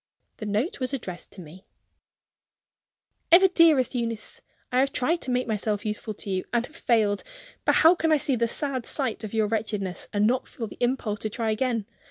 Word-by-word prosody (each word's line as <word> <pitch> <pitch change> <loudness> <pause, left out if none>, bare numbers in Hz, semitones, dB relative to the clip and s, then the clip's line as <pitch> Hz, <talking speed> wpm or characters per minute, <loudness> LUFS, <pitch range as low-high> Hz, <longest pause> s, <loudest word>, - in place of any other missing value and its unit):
The 215 - -6
note 215 - -1
was 255 +1 0
addressed 185 -9 -7
to 190 - -10
me: 175 +4 -13 1.7
"EVER 375 +3 +8
DEAREST 320 -8 +4
EUNEECE 230 -3 -4 0.3
I 250 - +2
have 275 +1 +2
tried 325 +8 0
to - - -5
make 250 0 +1
myself 215 -1 -1
useful 215 0 -3
to 200 - -7
you, 185 -1 -1
and 240 0 +1
have 315 - -17
failed. 215 -8 +1 0.4
But - - +4
how 325 +2 +7
can 325 -3 0
I 310 - +5
see 285 -2 +1
the 235 0 +1
sad 260 0 -2
sight 255 -6 -1
of 215 0 -5
your 220 -1 +3
wretchedness, 210 -3 -3
and 205 0 +2
not 250 +3 +1
feel 230 - -6
the - - -10
impulse 240 -4 0
to 215 - -3
try 225 +1 -2
again? 230 -1 -1
230 Hz, 200 wpm, -26 LUFS, 210-260 Hz, 1.7 s, EVER